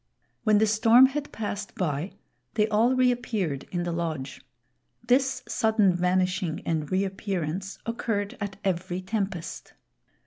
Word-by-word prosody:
When 215 -1 +5
the 220 - +4
storm 225 +4 +6
had 285 +2 -2
passed 205 -2 -5
by, 160 0 -2 0.4
they 215 -1 +3
all 230 +5 +3
reappeared 240 - 0
in 175 -1 -1
the 175 - -2
lodge. 160 -5 -3 0.6
This 260 +3 +2
sudden 220 -5 +3
vanishing 180 -1 0
and 155 -1 -1
reappearance 190 -1 -2
occurred 220 -3 -2
at 200 -1 -3
every 185 -1 -1
tempest. 195 -3 -4
195 Hz, 125 wpm, -27 LUFS, 175-220 Hz, 0.6 s, storm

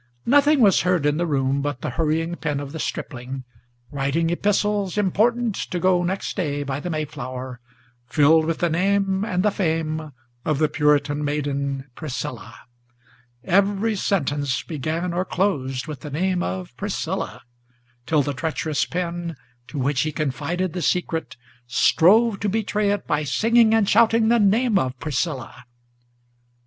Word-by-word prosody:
Nothing 285 +2 +4
was 200 -5 +5
heard 180 -4 +1
in 150 0 +2
the 175 +1 0
room 135 -2 +1
but 145 -3 -3
the - - -3
hurrying 165 +4 0
pen 150 -4 -2
of 140 -1 -6
the 160 - -6
stripling 130 -2 -5 0.5
Writing 145 +4 0
epistles 205 +1 0
important 225 +4 +2 0.2
to 180 - -2
go 180 0 +3
next 185 +2 -2
day 145 -6 -1
by 135 0 -3
the 175 - -5
Mayflower, 130 -5 -5 0.5
Filled 155 +3 +4
with 165 0 -1
the 175 - +1
name 195 +2 +1
and 185 -4 0
the 210 - +3
fame 160 -4 -2 0.3
of 155 - 0
the 155 +1 +3
Puritan 150 -1 +1
maiden 140 -2 -2
Priscilla; 150 -1 -6 0.8
Every 200 +3 +2
sentence 145 -9 0
began 165 +3 -3
or 180 +1 0
closed 140 -10 -1
with 150 -4 -7
the 150 - -8
name 180 +5 0
of 90 0 -4
Priscilla, - - -3 0.6
Till 155 -3 +3
the 145 - -2
treacherous 155 +1 -1
pen, 170 -1 -3 0.3
to 150 - -8
which 135 0 +1
he 155 - -1
confided 155 +5 -2
the 180 - -3
secret, 160 -5 -1 0.3
Strove 200 - +4
to 205 - -1
betray 210 0 0
it 205 0 -1
by 150 0 0
singing 225 - +3
and 220 -3 +3
shouting 225 +1 +4
the 235 0 +4
name 215 +1 +3
of 130 0 -2
Priscilla! 145 -4 -3
160 Hz, 150 wpm, -23 LUFS, 145-195 Hz, 0.8 s, was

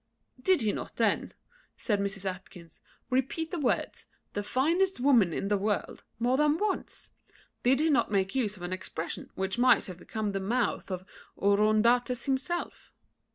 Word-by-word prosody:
"Did 370 -1 +3
he 215 -2 +2
not - - -6
then," - - 0 0.4
said 210 -4 0
Mrs. 200 -1 -3
Atkinson, 185 -3 -8 0.3
"repeat 265 +6 0
the 350 - -2
words, 275 - -1 0.3
the 205 - -1
finest 330 - +1
woman 245 -9 +4
in 195 - -2
the 205 -1 +1
world, 205 +1 -2
more 245 +3 +2
than 300 +1 +3
once? 410 +1 -3 0.5
did 255 +2 +3
he 315 +1 +3
not 280 - +3
make 195 -1 0
use 215 -6 -1
of 175 - -11
an 175 +1 -3
expression 170 -2 -5
which 190 +4 -2
might 255 +1 +5
have 180 -2 -8
become 215 0 -3
the 195 - -2
mouth 230 +5 -1
of 185 -1 -4 0.3
Oroondates 215 +4 +3
himself? 275 +6 -2
220 Hz, 160 wpm, -29 LUFS, 195-265 Hz, 0.5 s, might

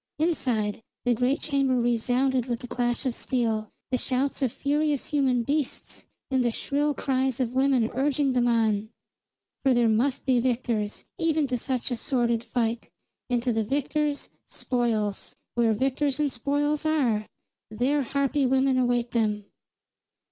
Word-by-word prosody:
Inside, 245 -11 0 0.2
the 245 - +4
great 250 +4 +1
chamber 275 -4 +1
resounded 245 +2 +1
with 240 -2 -2
the 245 - -7
clash 240 +2 -1
of 255 - 0
steel, 225 -4 -1 0.2
the 255 - +1
shouts 270 +2 -1
of 260 -4 +1
furious 290 +1 0
human 265 -5 +2
beasts, 285 +2 -3 0.2
and 260 -1 +2
the 240 - +2
shrill 290 +5 -1
cries 265 -2 0
of 250 -2 -1
women 260 -3 +3
urging 275 +1 +1
them 245 -1 +2
on; 220 -3 +1 0.7
for 265 -2 +3
there 240 -1 +4
must 240 +5 +1
be 255 -2 +3
victors, 235 -4 -1
even 320 -2 +2
to 255 -2 -1
such 255 +1 -2
a - - +1
sordid 235 -2 0
fight, 235 -1 -2 0.4
and 245 -1 +1
to 245 -2 +1
the 220 0 +1
victors, 290 +4 -1 0.2
spoils. 225 -5 -1 0.2
Where 235 -2 +3
victors 270 +5 0
and 295 -2 +1
spoils 290 +4 0
are, 255 -9 +1 0.4
there 255 +7 +1
harpy 280 +1 +1
women 265 0 +3
await 245 -1 +1
them. 210 -3 0
255 Hz, 150 wpm, -26 LUFS, 235-275 Hz, 0.7 s, the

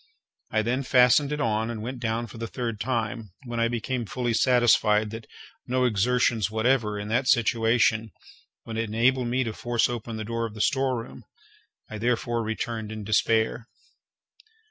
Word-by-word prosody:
I 110 -1 +1
then 125 +4 0
fastened 130 +2 +4
it 150 - -2
on 110 -2 0
and 110 -2 -5
went 125 +2 -5
down 115 0 -2
for 115 0 -11
the 115 - -4
third 115 -3 -4
time, 115 -3 -3
when 120 -1 -4
I 115 - +3
became 120 0 -3
fully 120 +3 -2
satisfied 110 -4 +3
that 110 0 -8 0.4
no 125 0 +1
exertions 115 -1 +1
whatever, 110 -1 +1
in 105 - -5
that 125 +4 +1
situation, 115 -2 +2 0.6
would 115 0 -4
enable 115 +4 +1
me 125 +2 0
to 115 -3 -4
force 120 0 0
open 115 -2 -5
the 110 - -4
door 115 +1 -2
of 110 - -12
the 105 - -4
storeroom. 130 -3 -1 0.6
I 110 - -7
therefore 120 0 0
returned 110 0 -4
in 110 -1 -6
despair. 110 +2 +1
115 Hz, 165 wpm, -26 LUFS, 110-125 Hz, 0.6 s, fastened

